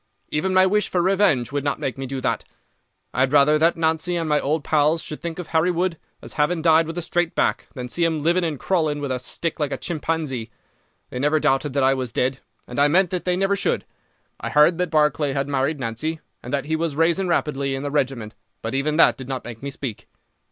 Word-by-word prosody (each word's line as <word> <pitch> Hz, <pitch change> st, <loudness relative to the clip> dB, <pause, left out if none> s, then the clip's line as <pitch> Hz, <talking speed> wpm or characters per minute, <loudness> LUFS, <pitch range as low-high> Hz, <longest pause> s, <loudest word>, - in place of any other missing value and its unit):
Even 170 Hz, +6 st, 0 dB
my 185 Hz, 0 st, +5 dB
wish 210 Hz, +2 st, +1 dB
for 180 Hz, -, 0 dB
revenge 180 Hz, -, +2 dB
would 145 Hz, -1 st, -2 dB
not 145 Hz, -1 st, 0 dB
make 130 Hz, -, -2 dB
me 135 Hz, 0 st, -5 dB
do 135 Hz, +1 st, -4 dB
that. -, -, -1 dB, 0.7 s
I -, -, -3 dB
had 130 Hz, 0 st, +3 dB
rather 150 Hz, +1 st, +5 dB
that 165 Hz, +2 st, +3 dB
Nancy 160 Hz, +2 st, 0 dB
and 165 Hz, -2 st, -1 dB
my 150 Hz, -1 st, +3 dB
old 150 Hz, +2 st, -1 dB
pals 155 Hz, +2 st, +2 dB
should 150 Hz, -, -7 dB
think 170 Hz, -1 st, -5 dB
of 180 Hz, -, -5 dB
Harry 160 Hz, +2 st, +2 dB
Wood 175 Hz, -1 st, -1 dB, 0.2 s
as -, -, -8 dB
having 155 Hz, +2 st, 0 dB
died 160 Hz, -1 st, +5 dB
with 165 Hz, +1 st, -6 dB
a 175 Hz, -, -2 dB
straight 175 Hz, 0 st, -1 dB
back, -, -, 0 dB
than 125 Hz, -2 st, -5 dB
see 170 Hz, +7 st, -1 dB
him 160 Hz, -3 st, 0 dB
living 175 Hz, +3 st, +2 dB
and 155 Hz, -5 st, -2 dB
crawling 155 Hz, -6 st, 0 dB
with 140 Hz, -2 st, -3 dB
a 130 Hz, -, -1 dB
stick 165 Hz, +7 st, -4 dB
like 145 Hz, -2 st, -1 dB
a -, -, -2 dB
chimpanzee. 155 Hz, -8 st, -3 dB, 0.6 s
They 125 Hz, -, -4 dB
never 150 Hz, +3 st, +2 dB
doubted 135 Hz, 0 st, +1 dB
that 140 Hz, -1 st, +1 dB
I 135 Hz, +1 st, +5 dB
was 130 Hz, -3 st, -3 dB
dead, 130 Hz, +3 st, 0 dB, 0.3 s
and 125 Hz, -, -4 dB
I 145 Hz, -, +6 dB
meant 180 Hz, +4 st, +3 dB
that 180 Hz, -2 st, -3 dB
they 180 Hz, 0 st, +1 dB
never 195 Hz, +1 st, +2 dB
should. 200 Hz, -, -1 dB, 0.5 s
I -, -, -4 dB
heard 155 Hz, +3 st, +4 dB
that 180 Hz, -1 st, 0 dB
Barclay 150 Hz, -2 st, +2 dB
had 135 Hz, 0 st, -1 dB
married 140 Hz, +2 st, 0 dB
Nancy, 135 Hz, +7 st, -3 dB, 0.2 s
and 125 Hz, -, -8 dB
that 140 Hz, -1 st, -1 dB
he 160 Hz, +1 st, 0 dB
was 160 Hz, -2 st, -2 dB
rising 170 Hz, +4 st, +2 dB
rapidly 140 Hz, -5 st, 0 dB
in 135 Hz, -, -5 dB
the 145 Hz, -, -3 dB
regiment, 130 Hz, -7 st, -1 dB, 0.3 s
but 115 Hz, -, -3 dB
even 145 Hz, +3 st, 0 dB
that 165 Hz, -, +5 dB
did 130 Hz, 0 st, -8 dB
not 130 Hz, -1 st, -4 dB
make 115 Hz, -2 st, -8 dB
me 140 Hz, -, -4 dB
speak. 135 Hz, -5 st, -6 dB
150 Hz, 240 wpm, -23 LUFS, 135-165 Hz, 0.7 s, I